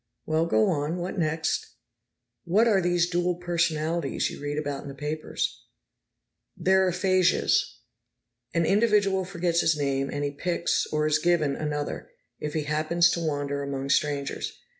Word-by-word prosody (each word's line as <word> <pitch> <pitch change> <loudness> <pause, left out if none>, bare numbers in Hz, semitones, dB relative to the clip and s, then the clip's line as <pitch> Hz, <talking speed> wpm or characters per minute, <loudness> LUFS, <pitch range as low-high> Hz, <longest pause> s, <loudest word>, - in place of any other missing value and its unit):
"Well, 160 +1 +1
go 110 -7 +3
on. 150 +2 -1
What 180 +2 -4
next?" 160 0 -1 0.7
"What 210 +7 +3
are 200 -4 +4
these 175 -1 +2
dual 175 0 0
personalities 170 -3 -1
you - - -9
read 145 0 -3
about 145 -2 -3
in - - -10
the 140 - -8
papers?" 150 +2 -3 1.0
"They're 190 0 +3
aphasias. 185 0 +2 0.7
An 170 -1 +1
individual 200 -1 +3
forgets 175 -2 0
his 160 -1 +2
name, 135 -1 -1
and 145 0 -3
he 145 - -1
picks, 170 +3 -1
or 150 0 0
is 155 0 +2
given, 155 -4 +2
another, 150 -1 -4 0.3
if 150 0 -4
he 155 - 0
happens 155 +3 +2
to - - -1
wander 145 -2 -2
among 140 -1 -4
strangers. 140 -1 -1
160 Hz, 150 wpm, -26 LUFS, 145-175 Hz, 1.0 s, are